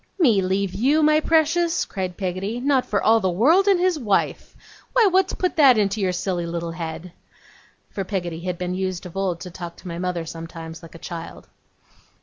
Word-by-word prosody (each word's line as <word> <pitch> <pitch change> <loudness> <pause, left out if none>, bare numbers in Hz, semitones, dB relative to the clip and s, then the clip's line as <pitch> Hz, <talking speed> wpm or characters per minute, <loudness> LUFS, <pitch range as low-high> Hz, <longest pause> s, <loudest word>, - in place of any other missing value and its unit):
'Me 240 - +4
leave 190 0 -1
you, 275 +10 +2
my 305 0 +5
precious!' 330 +2 +2
cried 185 -3 -5
Peggotty. 195 +4 -3
'Not 265 0 +1
for 200 - 0
all 225 +1 +5
the 190 -3 0
world 305 - +4
and 390 -3 +4
his 360 -3 +1
wife. 210 -6 -1 0.4
Why, 475 - +5
what's 380 -1 +3
put 365 - -1
that 270 -6 +7
in 205 -2 +3
your 195 -3 0
silly 180 -1 -2
little 170 0 -4
head?' 165 +1 -6 0.8
For 195 - -3
Peggotty 175 -4 -3
had 180 0 -4
been 180 0 -3
used 185 -1 -3
of 180 - -10
old 190 -3 -1
to 180 - -7
talk 170 0 -8
to - - -13
my 170 0 -5
mother 180 -2 -2
sometimes 165 0 -8
like 165 0 -13
a - - -7
child. 165 0 -8
190 Hz, 195 wpm, -23 LUFS, 175-275 Hz, 0.8 s, that